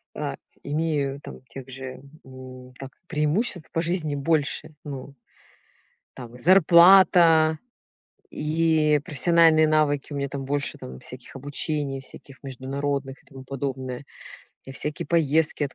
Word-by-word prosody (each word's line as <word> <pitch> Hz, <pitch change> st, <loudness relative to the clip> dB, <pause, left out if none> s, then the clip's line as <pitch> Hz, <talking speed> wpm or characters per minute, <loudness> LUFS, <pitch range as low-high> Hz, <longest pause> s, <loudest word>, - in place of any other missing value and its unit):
а -, -, -4 dB, 0.3 s
имею 145 Hz, -2 st, -2 dB
там -, -, -11 dB
тех 130 Hz, +2 st, -10 dB
же, 130 Hz, 0 st, -8 dB, 0.2 s
м, 130 Hz, -1 st, -12 dB
как 135 Hz, 0 st, -9 dB, 0.2 s
преимуществ 170 Hz, +4 st, -1 dB
по 165 Hz, -, -1 dB
жизни 165 Hz, -4 st, -1 dB
больше, 150 Hz, +1 st, -1 dB
ну, 140 Hz, -1 st, -8 dB, 1.0 s
там 120 Hz, -1 st, -10 dB
и -, -, -14 dB
зарплата, 170 Hz, -1 st, +6 dB, 0.7 s
и 155 Hz, -1 st, +1 dB
профессиональные 165 Hz, 0 st, +4 dB
навыки 150 Hz, -2 st, +1 dB
у -, -, -4 dB
меня 140 Hz, 0 st, -2 dB
там 140 Hz, -1 st, -6 dB
больше, 140 Hz, +1 st, -1 dB
там 65 Hz, 0 st, -10 dB
всяких 125 Hz, +1 st, -10 dB
обучений, 145 Hz, 0 st, -2 dB
всяких 135 Hz, +1 st, -12 dB
международных 135 Hz, +1 st, -4 dB
и -, -, -35 dB
тому 135 Hz, -1 st, -12 dB
подобное. 130 Hz, -1 st, -5 dB, 0.6 s
И 135 Hz, -, -9 dB
всякие 150 Hz, +2 st, -4 dB
поездки 160 Hz, -2 st, +2 dB
от 140 Hz, -, -7 dB
145 Hz, 130 wpm, -24 LUFS, 135-160 Hz, 1.0 s, зарплата